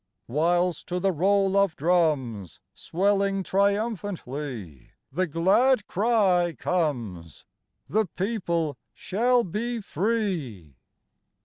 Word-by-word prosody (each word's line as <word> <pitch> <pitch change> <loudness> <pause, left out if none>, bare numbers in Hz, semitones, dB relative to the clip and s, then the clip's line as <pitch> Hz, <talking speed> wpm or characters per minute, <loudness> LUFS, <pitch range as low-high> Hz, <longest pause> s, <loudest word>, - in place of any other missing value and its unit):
Whilst 175 +5 +1
to 180 0 -2
the 195 +1 +2
roll 195 +3 +2
of 200 -4 +3
drums 140 - 0
Swelling 195 +1 0
triumphantly, 170 - -2 0.2
the 185 +6 0
glad 200 - +3
cry 190 -5 +2
comes: 120 - -3 0.4
The 215 -1 +1
People 170 - -2 0.2
shall 240 +5 +1
be 230 +6 -3
free! 175 - -2
180 Hz, 90 wpm, -26 LUFS, 150-200 Hz, 0.4 s, of